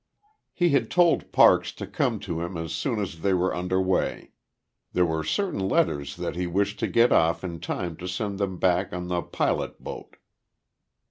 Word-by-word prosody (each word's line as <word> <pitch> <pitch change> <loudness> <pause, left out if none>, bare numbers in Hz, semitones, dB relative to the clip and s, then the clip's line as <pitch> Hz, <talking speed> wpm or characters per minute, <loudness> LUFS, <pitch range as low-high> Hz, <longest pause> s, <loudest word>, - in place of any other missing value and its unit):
He 175 -2 +2
had 135 -7 +2
told 175 -2 +3
Parks - - +5
to - - -6
come - - -1
to 85 -1 -4
him 85 +1 -4
as 80 -1 -4
soon 120 -6 -1
as 90 -5 -4
they 95 +1 +2
were 90 +1 +1
under 90 +1 -1
way. 95 0 -1 0.6
There 90 - +3
were 80 -1 -1
certain 185 - -1
letters 70 -5 0
that 85 -1 -4
he 90 0 -2
wished 100 +4 -1
to - - 0
get 120 +1 +4
off 80 +2 +3
in 85 -3 -5
time 85 -1 -4
to 90 - -7
send 100 +2 -3
them 95 -2 -2
back 90 +1 +1
on 90 0 -4
the 90 -1 0
pilot - - -2
boat. - - -8
90 Hz, 190 wpm, -26 LUFS, 85-100 Hz, 0.6 s, Parks